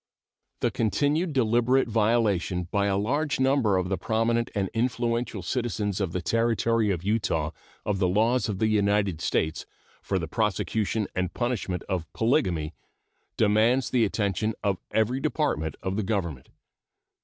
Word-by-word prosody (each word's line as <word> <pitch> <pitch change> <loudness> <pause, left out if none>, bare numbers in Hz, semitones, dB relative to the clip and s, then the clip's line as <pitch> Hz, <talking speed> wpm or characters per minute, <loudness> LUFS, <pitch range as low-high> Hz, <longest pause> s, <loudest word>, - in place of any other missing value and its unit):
The - - +1
continued 145 - +1
deliberate 125 0 +2
violation 105 -5 +1
by 100 -1 +1
a 100 -1 +1
large 145 +9 0
number 130 -7 +3
of 90 -1 0
the 95 0 -2
prominent 115 +1 0
and 100 -2 0
influential 115 -3 -1
citizens 105 -3 -2
of 95 -4 -1
the 90 0 -3
Territory 115 +2 +1
of 90 -3 -1
Utah 95 -7 0 0.3
of 100 -2 -1
the 95 - +2
laws 115 +6 +2
of 100 - -2
the 110 - +1
United 100 -5 +1
States 80 -1 -1 0.3
for 95 - -1
the 85 -3 -3
prosecution 105 +2 0
and 90 -2 -2
punishment 120 -7 -2
of 85 -7 -3
polygamy 95 - +1 0.6
demands 115 +4 +3
the 125 -3 +3
attention 105 +1 0
of 100 -4 0
every 110 +4 +1
department 140 - -1
of 95 +1 -2
the 110 - 0
Government. 85 - -3
110 Hz, 145 wpm, -26 LUFS, 95-120 Hz, 0.6 s, number